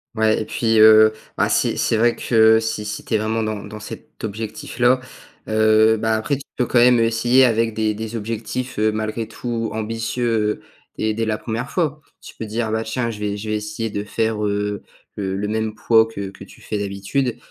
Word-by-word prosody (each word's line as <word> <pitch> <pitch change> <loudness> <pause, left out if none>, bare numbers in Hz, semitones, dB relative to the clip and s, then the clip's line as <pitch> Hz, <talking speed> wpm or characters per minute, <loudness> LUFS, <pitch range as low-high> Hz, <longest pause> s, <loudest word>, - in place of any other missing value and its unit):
Ouais 110 0 +2
et - - -4
puis, 115 0 +1
heu, 110 0 +8 0.2
bah, - - +2
si - - +1
c'est 115 - +1
vrai 120 +2 +3
que 110 -1 +4
si 110 -1 -3
si 105 0 -5
tu - - -5
es - - +5
vraiment 110 +1 -1
dans 110 -1 -3
dans 110 - -9
cet 105 - -11
objectif-là, 110 +4 0 0.5
heu, 110 0 +4
bah, 110 0 +1
après 120 +6 -1
tu 140 - -10
peux, 125 - +1
quand 120 - +2
même, 125 +1 +6
heu, - - +4
essayer 120 +3 +4
avec 115 -1 +1
des 110 -1 +1
des 110 +2 -5
des 115 - -8
objectifs, 115 +3 -4
heu, 110 0 +3
malgré 110 +1 -3
tout, 115 -2 -4
ambitieux, 115 0 -1 0.4
dès 110 0 0
dès 115 +1 -1
la 110 -1 -1
1re 115 +3 -4
fois. 155 -4 -1 0.2
Tu - - -12
peux 110 - -6
dire: 110 +1 -2
«Bah 110 0 0
tiens! 115 +1 -2
Je 105 - -8
vais 105 -1 -2
je 110 +1 -6
vais 110 - 0
essayer 105 +2 -4
de 100 0 -3
faire, 110 0 -1
heu, 105 0 -2 0.4
le 95 -2 -2
le 100 +1 -2
même 110 0 -2
poids 115 0 +4
que 100 -3 -6
que - - -12
tu - - -16
fais 105 - -3
d'habitude» 100 +6 -2
110 Hz, 215 wpm, -21 LUFS, 105-115 Hz, 0.5 s, heu